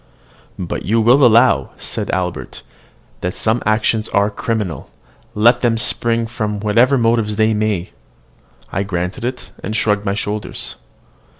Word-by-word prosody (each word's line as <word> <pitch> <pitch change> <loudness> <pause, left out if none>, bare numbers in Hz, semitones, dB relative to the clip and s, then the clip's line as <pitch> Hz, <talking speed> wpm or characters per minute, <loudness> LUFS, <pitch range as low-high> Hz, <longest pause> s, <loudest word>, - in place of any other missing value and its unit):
"But 90 - -4
you 115 +4 +1
will 120 +5 +5
allow," 115 -1 +5
said - - -4
Albert; 90 -1 -3 0.6
"that 90 +1 -3
some 110 +2 +1
actions 110 0 +1
are 100 0 +2
criminal, 105 - -3 0.5
let 120 +3 +4
them 115 -2 +2
spring 115 +1 +1
from 105 -3 -3
whatever 115 +6 +3
motives 115 -3 +1
they 110 +1 +2
may." 105 -4 -1 0.8
I 95 - -1
granted 90 +1 -3
it, 120 -6 -5
and 110 - -4
shrugged 105 -2 +1
my 100 -1 -1
shoulders. 105 0 -4
110 Hz, 135 wpm, -18 LUFS, 100-115 Hz, 0.8 s, will